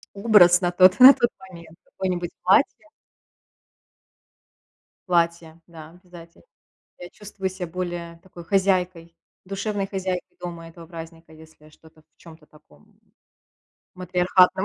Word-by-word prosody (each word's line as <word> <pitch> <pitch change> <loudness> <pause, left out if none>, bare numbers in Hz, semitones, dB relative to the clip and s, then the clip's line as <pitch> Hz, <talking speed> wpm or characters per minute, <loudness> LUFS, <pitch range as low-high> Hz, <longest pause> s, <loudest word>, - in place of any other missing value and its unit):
образ 200 -4 +4
на 175 -1 -1
тот 185 +2 +4
на 260 +2 +10
тот 240 - 0
момент, 170 -4 -15
какое-нибудь 180 -2 -5
платье 280 +10 +1 2.2
платье, 170 -2 -1
да, 160 -2 -13
обязательно. 175 - -17 0.5
Я 175 - -10
чувствую 200 -2 -7
ся 185 -2 -8
более 175 -1 -6
такой, 180 -2 -13
хозяйкой, 180 -2 -1 0.3
душевной 200 +1 -4
хозяйкой 185 -2 -5
дома 170 -2 -8
этого 165 0 -14
праздника, 165 -1 -12
если 155 -1 -18
что-то 155 0 -22
в - - -52
чем-то 160 -2 -17
таком 75 - -24 1.0
матриархатном. 180 +1 +1
175 Hz, 115 wpm, -22 LUFS, 165-190 Hz, 2.2 s, на